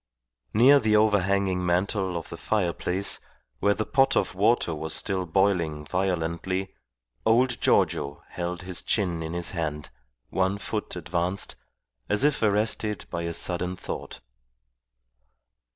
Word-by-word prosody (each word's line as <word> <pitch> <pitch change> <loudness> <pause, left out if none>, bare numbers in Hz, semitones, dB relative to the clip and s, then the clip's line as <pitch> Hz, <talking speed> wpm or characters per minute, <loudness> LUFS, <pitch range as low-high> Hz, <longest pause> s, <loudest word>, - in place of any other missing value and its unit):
Near 135 +6 +7
the 110 -3 +2
overhanging 100 -3 +2
mantel 90 +1 0
of 85 - -7
the - - -6
fireplace, 95 -1 +1 0.4
where 100 0 +3
the 110 - -2
pot 135 0 +3
of - - +1
water 100 -2 +2
was 80 0 -3
still 95 -2 -1
boiling 80 -4 +1
violently, 95 +1 -1 0.5
old 120 +2 +3
Giorgio 70 +1 +1
held 90 0 -4
his 90 -2 -3
chin 90 -6 0
in 80 +1 -4
his 85 0 -2
hand, 75 -5 -4 0.4
one 95 +1 +1
foot 105 +1 -4
advanced, 90 +3 -2 0.5
as 105 +5 +1
if 145 -1 +2
arrested 105 -1 0
by 85 - -2
a 85 0 -2
sudden 90 +2 -1
thought. - - -7
95 Hz, 130 wpm, -26 LUFS, 85-105 Hz, 0.5 s, Near